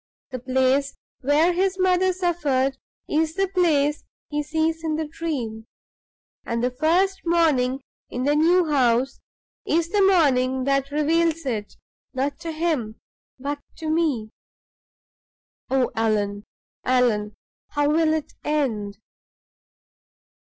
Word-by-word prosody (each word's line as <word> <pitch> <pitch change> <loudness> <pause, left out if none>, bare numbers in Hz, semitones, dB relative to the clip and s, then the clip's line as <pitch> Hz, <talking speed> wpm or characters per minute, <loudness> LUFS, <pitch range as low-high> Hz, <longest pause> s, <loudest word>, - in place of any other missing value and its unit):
"The 255 - -4
place 260 +2 +1 0.2
where 300 +6 +3
his 380 +1 0
mother 370 0 +3
suffered 300 -8 0 0.3
is 315 +1 0
the 390 0 +1
place 305 -6 +2 0.3
he 295 0 -1
sees 320 +2 -1
in 315 -1 -1
the 315 0 -2
Dream; 250 -9 -4 0.8
and 235 0 -2
the 250 - +1
first 345 +8 +1
morning 280 -7 +2 0.3
in 250 - -3
the 290 +2 +2
new 345 +4 +4
house 265 -3 +1 0.4
is 335 +1 0
the 410 +2 +2
morning 265 -9 +3
that 275 0 +1
reveals 320 +2 +1
it, 215 -5 -3 0.4
not 275 +2 -1
to 330 - -5
him, 310 -9 -1 0.4
but 285 +2 -4 0.2
to 315 -1 -3
me. 290 -10 0 1.4
Oh, 260 -1 +1
Allan! 210 -2 0 0.4
Allan! 225 -5 +1 0.3
how 290 0 0
will 320 0 +3
it 310 - -5
end?" 225 -10 -1
290 Hz, 120 wpm, -23 LUFS, 255-330 Hz, 1.4 s, new